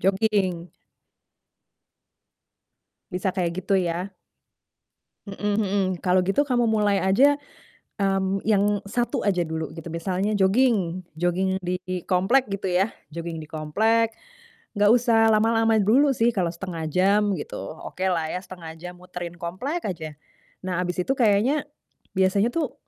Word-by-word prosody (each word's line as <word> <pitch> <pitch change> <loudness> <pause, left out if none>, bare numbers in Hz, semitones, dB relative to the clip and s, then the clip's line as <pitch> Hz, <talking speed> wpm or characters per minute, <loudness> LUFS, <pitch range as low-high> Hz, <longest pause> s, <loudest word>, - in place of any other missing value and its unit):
Joging. 190 -3 0 2.4
Bisa 180 +1 -1
kayak 175 -3 -1
gitu 200 - -1
ya? 180 +3 -3 1.1
Mhm 205 +1 -2
mhm. 200 -2 +1 0.2
Kalau 185 0 +4
gitu 195 +11 +1
kamu 240 -3 +2
mulai 205 -3 +2
aja, 260 +10 +5 0.6
mmm, 195 -1 0
yang 205 -1 +2
1 240 +4 -1
aja 190 -4 +2
dulu 160 -2 -4
gitu. 165 0 -8
Misalnya, 185 +5 -1
joging 195 -3 +2 0.2
joging 185 +2 0
di 180 0 -3
komplek 195 +9 +3
gitu 195 -1 -2
ya, 190 +4 +1 0.2
joging 165 0 -6
di 155 - -11
komplek, 220 +9 +1 0.7
nggak 205 0 +5
usah 230 -2 +4
lama-lama 225 +1 +3
dulu 270 +7 +4
sih, 235 0 +3
kalau 180 -6 -1
1/2 170 -2 -6
jam 195 +5 +2
gitu, 150 - -6
okelah 165 0 -3
ya 180 - -2
1/2 170 -3 -9
jam 180 +2 -8
muterin 175 -1 -7
komplek 190 - -4
aja. 160 -4 -5 0.5
Nah 185 -2 -2
habis 180 0 -1
itu 270 - 0
kayaknya, 240 +6 +2 0.5
biasanya 190 +4 +2
tuh, 315 -6 -1
190 Hz, 130 wpm, -24 LUFS, 180-215 Hz, 2.4 s, aja